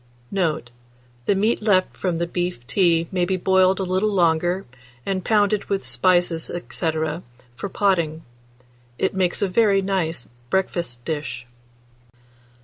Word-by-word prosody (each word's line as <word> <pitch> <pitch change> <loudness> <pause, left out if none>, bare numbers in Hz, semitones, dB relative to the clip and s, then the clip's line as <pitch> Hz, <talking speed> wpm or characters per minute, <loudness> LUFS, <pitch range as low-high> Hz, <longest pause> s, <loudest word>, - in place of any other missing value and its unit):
Note. 160 -10 -1 0.6
The 200 - +4
meat 215 +4 +1
loft 195 -4 +2
from 180 -3 -1
beef 170 -6 -2
tea 170 +1 +2
may 180 -2 +1
be 185 +1 0
boiled 190 +1 +3
a - - 0
little 185 +3 +1
longer, 175 0 +2 0.4
and 190 -2 -1
pounded, 210 -1 +2
with 195 -1 -2
spices, 175 -3 +2 0.2
&c., 160 +4 0 0.6
for 200 - -5
potting. 170 -7 +1 0.7
It 190 - 0
makes 185 +1 +1
a - - +2
very 195 0 +3
nice 175 -7 -1 0.2
breakfast 170 -10 -1
dish. 145 -5 -4
185 Hz, 130 wpm, -23 LUFS, 165-195 Hz, 0.7 s, The